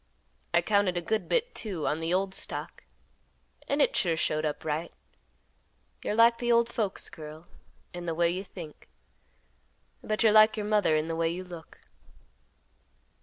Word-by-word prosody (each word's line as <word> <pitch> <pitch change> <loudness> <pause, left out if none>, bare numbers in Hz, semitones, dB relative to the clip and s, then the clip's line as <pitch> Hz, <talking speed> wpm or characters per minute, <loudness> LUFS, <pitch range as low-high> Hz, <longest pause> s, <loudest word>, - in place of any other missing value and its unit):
I 170 - +3
counted 200 -2 +2
a - - +2
good 215 +6 -2
bit, - - +1
too, 185 -9 -3
on 155 - 0
the 165 +1 -2
old 190 +1 0
stock, - - -5 0.8
and 285 +1 +3
it - - 0
sure 170 -4 +1
showed 155 0 0
up 150 +1 -3
right. 155 +2 -2 1.1
You're 210 - -1
like 230 +1 +5
the 240 0 0
old 235 0 +4
folks, 210 -6 -2
girl, 155 +1 -10 0.5
in 175 0 -6
the 165 - -1
way 170 0 +2
you 185 +2 -3
think, 170 -6 -11 1.1
but 215 +2 0
you're 220 - +6
like 215 +1 +6
your 210 - -2
mother 210 -6 +3
in 155 +1 0
the 165 - -2
way 165 0 +1
you 175 +2 -4
look." 175 -3 -12
180 Hz, 170 wpm, -28 LUFS, 165-215 Hz, 1.1 s, you're